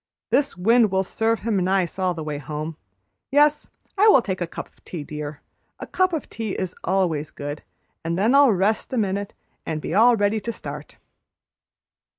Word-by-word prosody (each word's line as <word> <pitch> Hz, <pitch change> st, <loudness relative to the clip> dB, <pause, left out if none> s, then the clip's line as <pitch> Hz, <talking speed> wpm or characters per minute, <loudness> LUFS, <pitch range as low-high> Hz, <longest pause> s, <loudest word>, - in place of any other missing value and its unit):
"This 285 Hz, -7 st, +1 dB
wind 225 Hz, +4 st, +4 dB
will 190 Hz, 0 st, +1 dB
serve 225 Hz, +3 st, -1 dB
him 220 Hz, -2 st, 0 dB
nice 185 Hz, -1 st, 0 dB
all 185 Hz, -2 st, +1 dB
the 160 Hz, -, -5 dB
way 150 Hz, -1 st, -4 dB
home. 150 Hz, +2 st, -5 dB, 0.5 s
Yes, 295 Hz, +1 st, +3 dB, 0.3 s
I 420 Hz, -, +6 dB
will 270 Hz, -, +7 dB
take 190 Hz, -4 st, -3 dB
a 175 Hz, -, -1 dB
cup -, -, -7 dB
of -, -, -32 dB
tea, 165 Hz, -5 st, -6 dB
dear, 150 Hz, 0 st, -7 dB, 0.4 s
a -, -, -5 dB
cup 370 Hz, 0 st, +1 dB
of 320 Hz, -3 st, -3 dB
tea 220 Hz, -4 st, -4 dB
is 185 Hz, -2 st, -3 dB
always 170 Hz, -5 st, 0 dB
good; 145 Hz, +1 st, -6 dB, 0.4 s
and 165 Hz, +1 st, -2 dB
then 215 Hz, +6 st, +3 dB
I'll 280 Hz, -3 st, +7 dB
rest 200 Hz, +3 st, 0 dB
a -, -, 0 dB
minute 200 Hz, -2 st, -1 dB, 0.3 s
and 160 Hz, -1 st, -3 dB
be 155 Hz, -, -5 dB
all 230 Hz, +5 st, +6 dB
ready 205 Hz, +1 st, +1 dB
to 235 Hz, -, -4 dB
start." 150 Hz, -7 st, -8 dB
190 Hz, 185 wpm, -23 LUFS, 160-230 Hz, 0.5 s, will